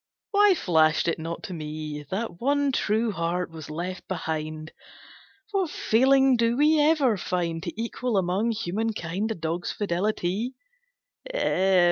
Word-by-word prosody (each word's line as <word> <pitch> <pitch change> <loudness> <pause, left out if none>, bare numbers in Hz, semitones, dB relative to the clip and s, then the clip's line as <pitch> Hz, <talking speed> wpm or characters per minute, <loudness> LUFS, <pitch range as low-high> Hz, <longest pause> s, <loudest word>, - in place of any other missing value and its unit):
Why 410 -2 +5
flashed 160 - +3
it 170 - 0
not 165 +1 -5
to 185 - -6
me 155 -2 -5
That 190 -2 -4
one 285 +2 +2
true 220 -2 +1
heart 175 -1 -2
was 160 -2 -9
left 175 +4 -5
behind! 155 -3 -4 0.8
What 385 -5 0
feeling 265 +1 +4
do 230 +1 +2
we 305 +2 +4
ever 295 -7 +3
find 170 -2 -2
To 175 -1 -4
equal 235 0 -1
among 190 +5 +1
human 225 0 -1
kind 190 +4 -3
A 225 - -2
dog's 165 +1 -3
fidelity!" 205 +4 -1
190 Hz, 135 wpm, -26 LUFS, 165-235 Hz, 0.8 s, Why